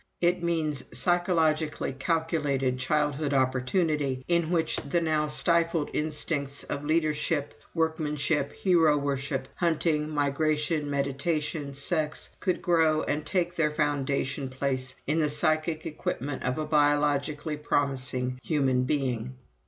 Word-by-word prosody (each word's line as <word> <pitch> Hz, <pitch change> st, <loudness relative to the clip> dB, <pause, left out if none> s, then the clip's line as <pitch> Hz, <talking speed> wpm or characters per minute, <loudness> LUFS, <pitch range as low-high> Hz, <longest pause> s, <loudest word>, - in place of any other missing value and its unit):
It 175 Hz, +1 st, +2 dB
means 160 Hz, -5 st, -1 dB
psychologically 160 Hz, -5 st, +1 dB
calculated 145 Hz, -4 st, 0 dB
childhood 145 Hz, +1 st, 0 dB
opportunity, 130 Hz, +1 st, 0 dB
in 170 Hz, -2 st, +2 dB
which 160 Hz, -2 st, +1 dB
the 145 Hz, +5 st, 0 dB
now 155 Hz, -2 st, +1 dB
stifled 165 Hz, 0 st, +1 dB
instincts 150 Hz, -2 st, -1 dB
of 140 Hz, -, -4 dB
leadership, 155 Hz, -1 st, 0 dB, 0.2 s
workmanship, 155 Hz, -3 st, 0 dB
hero 165 Hz, -5 st, +3 dB
worship, 140 Hz, -1 st, -2 dB
hunting, 160 Hz, -3 st, +1 dB
migration, 150 Hz, +1 st, 0 dB
meditation, 140 Hz, +1 st, -1 dB
sex, 155 Hz, +1 st, -1 dB
could 185 Hz, -2 st, -1 dB
grow 160 Hz, -3 st, +3 dB
and 150 Hz, +1 st, -1 dB
take 175 Hz, -2 st, 0 dB
their 160 Hz, -3 st, +2 dB
foundation 140 Hz, -2 st, -1 dB
place 130 Hz, -1 st, -1 dB
in 155 Hz, +3 st, +1 dB
the 150 Hz, -2 st, +2 dB
psychic 155 Hz, +2 st, 0 dB
equipment 145 Hz, -3 st, -3 dB
of 125 Hz, +2 st, -1 dB
a 155 Hz, -, -1 dB
biologically 145 Hz, 0 st, +1 dB
promising 130 Hz, -3 st, 0 dB
human 130 Hz, -4 st, +1 dB
being. 130 Hz, -4 st, -1 dB
150 Hz, 115 wpm, -28 LUFS, 140-160 Hz, 0.2 s, hero